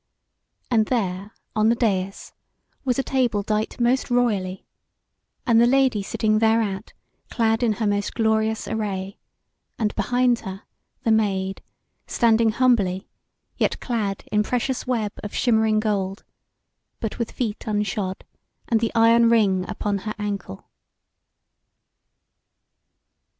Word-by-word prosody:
And 220 -3 +3
there 200 -4 -2 0.2
on 215 0 +3
the 235 - +3
dais 195 -5 -1 0.5
was 250 -3 0
a 270 - +1
table 245 -7 0
dight 215 +3 -2
most 245 +3 +2
royally, 210 -7 0 0.8
and 230 -4 +5
the 240 - +5
Lady 260 -4 +3
sitting 215 +2 0
thereat, 220 -3 +1 0.4
clad 225 -1 +1
in 230 -3 +2
her 220 +1 -2
most 205 -1 -1
glorious 220 -1 +1
array, 200 -3 -3 0.6
and 215 -2 0
behind 245 +3 +2
her 190 -1 -8 0.4
the 225 - +2
Maid 195 -3 0 0.5
standing 230 -1 +3
humbly, 215 -6 +1 0.5
yet - - 0
clad 210 -6 -2
in 210 0 +3
precious 250 +4 -2
web 225 -5 0
of 210 - -7
shimmering 220 -3 +3
gold, 200 -3 -2 0.8
but 220 0 -4
with 235 - -1
feet 225 -4 -3
unshod, 205 -2 -2 0.4
and 230 - +2
the 225 0 0
iron 230 +1 +5
ring 195 -5 +2
upon 205 -1 -2
her 215 +2 -5
ankle. 200 - -5
220 Hz, 125 wpm, -23 LUFS, 200-235 Hz, 0.8 s, and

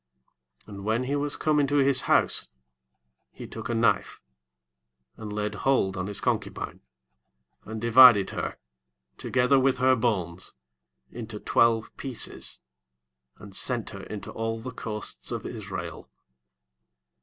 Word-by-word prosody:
29 105 - -11
And - - -9
when 110 +4 0
he 135 +3 -1
was 145 0 -1
come 155 -1 +2
into 145 0 +1
his 135 -2 +3
house, - - +3 0.8
he - - -10
took 115 +1 -7
a 120 - 0
knife, 115 +1 +1 1.0
and 105 -2 -8
laid 105 0 -2
hold 105 -4 +1
on 90 0 -3
his 105 - 0
concubine, - - -3 0.8
and 110 +1 -6
divided 115 -3 +7
her, - - -4 0.6
together 130 +2 +3
with 130 0 +2
her 130 +1 +4
bones, 95 - -2 0.6
into 110 -2 -7
twelve 115 0 +2
pieces, 130 -4 -2 0.8
and 100 -2 -11
sent 120 0 0
her 100 - -8
into 105 -2 -7
all 115 0 -3
the 130 +3 -7
coasts 105 -3 -5
of - - -4
Israel. - - -6
115 Hz, 130 wpm, -27 LUFS, 105-130 Hz, 1.0 s, divided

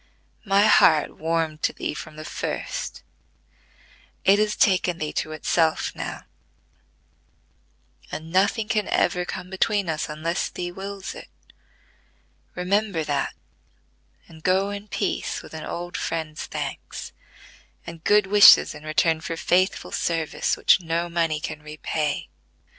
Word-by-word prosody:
My 200 +1 +4
heart 155 -7 +4
warmed 160 -1 -1
to - - +1
thee - - -3
from 155 0 -8
the 155 0 -8
first: - - -4 1.2
it 200 +2 +6
has 215 0 +1
taken 180 -3 +2
thee 155 -2 -4
to 155 - -2
itself 160 +1 +1
now; - - -5 1.9
and 160 +1 -6
nothing 200 +4 +2
can 210 -2 0
ever 180 0 +1
come 180 +1 -6
between 200 0 +1
us, 155 -1 -2
unless 155 +3 -2
thee 175 0 -5
wills 195 +1 -6
it. - - -10 1.3
Remember 195 -1 0
that, 145 -2 -1 0.9
and 160 -1 -15
go 190 +3 +2
in 205 +1 -7
peace - - -2
with - - -13
an - - -6
old 175 +1 -5
friend's 160 -2 -3
thanks, - - -6 0.7
and 165 -1 -9
good 210 -1 +4
wishes 205 +1 +8
in 150 - -11
return 160 +1 +1
for 165 +1 -4
faithful 185 +3 +1
service, 165 -2 -1
which - - +5
no 170 +1 -2
money 165 -2 0
can 150 0 -6
repay." 150 0 -3
170 Hz, 130 wpm, -24 LUFS, 155-195 Hz, 1.9 s, wishes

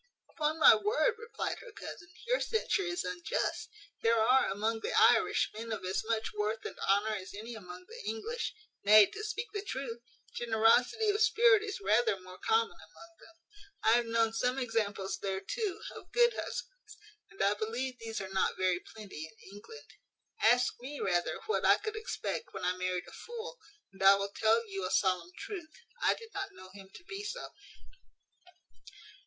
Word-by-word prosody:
"Upon 310 0 -1
my 320 - +9
word," 430 +4 +2
replied 465 +1 -4
her - - -11
cousin, 380 -3 -9 0.2
"your - - +2
censure 445 -2 0
is 350 -1 -2
unjust. 180 -1 -2 0.3
There 230 0 +3
are, 250 +3 +4
among 220 +3 -1
the - - -3
Irish, 225 +1 +4
men 225 +2 -6
of 215 -4 -4
as 190 +1 -1
much 225 0 -1
worth 210 +1 -2
and - - -5
honour 205 +3 +2
as 190 +1 -9
any 225 +3 -7
among 180 -4 -10
the - - -10
English: 455 - -3 0.3
nay, 210 +1 +9
to 425 - -8
speak 455 +2 -4
the 410 - -2
truth, 260 - -5 0.3
generosity 240 - +3
of 415 +1 -1
spirit 445 -1 +5
is 415 -2 -4
rather 230 - +2
more 185 0 -12
common 450 0 +1
among 335 0 -16
them. 330 - -17 0.5
I 220 - +5
have 240 +1 +4
known 230 -1 +2
some 250 +3 0
examples 210 -6 -1
there, 190 -1 -2
too, 435 - -3
of - - -12
good 475 -1 +4
husbands; - - -7 0.3
and 195 - -19
I 200 +1 +4
believe 235 +5 -3
these 225 -1 -5
are 190 - -6
not 190 - +1
very 185 -1 +2
plenty 190 -7 -9
in 195 +1 -16
England. 450 - -12 0.5
Ask 245 +3 +4
me, 280 +3 -7
rather, 175 -2 0
what 440 - 0
I - - +6
could 430 0 -5
expect 450 +1 -4
when - - -4
I 180 0 +1
married 185 -1 -2
a - - -11
fool; 470 +1 -8 0.3
and 195 - -14
I 195 +1 +8
will 200 0 -3
tell 225 +1 +3
you 195 -2 -4
a 185 - -1
solemn 185 -3 +1
truth; 350 -6 -6 0.3
I - - +4
did 455 -1 -13
not 390 0 -4
know 185 - -13
him 195 -1 -12
to - - -12
be 390 +3 -7
so." 475 +4 -5
230 Hz, 180 wpm, -32 LUFS, -, 0.5 s, my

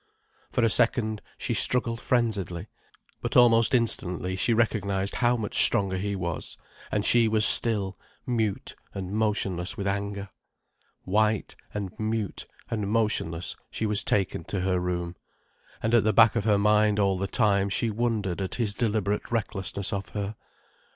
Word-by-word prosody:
For 120 - 0
a 115 - +4
second, 110 -2 +2 0.2
she - - -2
struggled 115 -2 +1
frenziedly. 100 -8 -1 0.6
But - - 0
almost 115 0 +5
instantly 95 -6 0
she 105 +6 0
recognized 100 -4 0
how 120 0 +2
much 110 -3 +2
stronger 95 -2 +3
he 100 +2 -2
was, 85 -4 -5 0.3
and 105 -1 0
she 120 -1 +4
was 110 -1 +4
still, 100 -5 +3 0.3
mute 110 -6 -2 0.2
and 95 -1 -5
motionless 105 -2 -1
with 100 - -4
anger. 100 0 -3 0.7
White, 105 +2 0 0.2
and 100 -3 -4
mute, 110 -2 -3 0.2
and 105 -3 -2
motionless, 105 -7 -1
she 110 - -3
was 105 0 +2
taken 95 -4 0
to 100 - -3
her 90 -1 +1
room. 90 -1 -3 0.7
And 110 - 0
at 120 -4 +5
the 110 0 +2
back 115 -1 +6
of 110 -3 -1
her 105 -2 +4
mind 105 0 +3
all 100 -2 +1
the 100 - -1
time 100 -2 +2
she 110 +3 0
wondered 105 -5 -1
at 95 - -3
his 110 -5 -1
deliberate 105 -2 -1
recklessness 100 -3 -2
of 100 -1 -4
her. 105 +1 -4
105 Hz, 155 wpm, -26 LUFS, 95-110 Hz, 0.7 s, back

